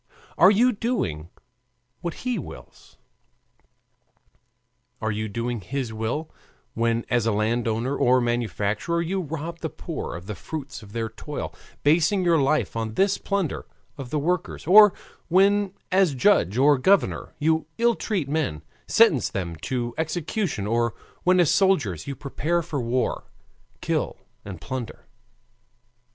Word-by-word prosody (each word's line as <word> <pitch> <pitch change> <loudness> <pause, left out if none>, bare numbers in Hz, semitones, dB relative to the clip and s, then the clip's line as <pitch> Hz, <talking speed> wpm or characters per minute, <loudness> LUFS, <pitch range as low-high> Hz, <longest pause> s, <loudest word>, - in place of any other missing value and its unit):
Are 185 - +7
you 235 +5 +4
doing 195 - -2 0.7
what 170 +7 -6
he 250 -5 0
wills? 145 - -12 2.0
Are 110 0 -1
you 110 +1 -2
doing 115 +2 -3
his 125 +3 -4
will, 115 +9 -3 0.4
when 115 0 0
as 120 -2 +2
landowner 115 +4 0
or 125 -1 +4
manufacturer 120 +4 -1
you 185 +3 -1
rob 165 +1 -5
the - - -3
poor - - -6
of 90 +1 -8
the 105 - -5
fruits 135 - -7
of 105 -1 -14
their 115 -1 -2
toil, 140 +6 -6 0.3
basing 170 +6 +3
your 170 -2 +4
life 145 0 +1
on 110 -1 -3
this 195 0 +2
plunder 195 -5 -2 0.3
of 135 -4 -8
the 150 - -1
workers, 170 +3 -2
or 210 +4 +8 0.4
when, 195 +2 +3 0.2
as 185 -6 +3
judge 125 - +3
or 140 +1 +5
governor, 195 +8 +2
you 160 0 +1
ill 235 +1 +3
treat 195 -10 -2
men, 140 - -2 0.2
sentence - - +4
them 85 -4 -4
to 120 +6 -3
execution, 160 - -2
or 115 +1 0 0.3
when 185 0 +3
as 170 -5 +4
soldiers 145 - +2
you 140 - -4
prepare 160 +5 -1
for 155 -5 -3
war, 120 +2 -1 0.6
kill - - -1 0.3
and 95 -4 -8
plunder? 125 +6 -6
140 Hz, 140 wpm, -24 LUFS, 115-175 Hz, 2.0 s, or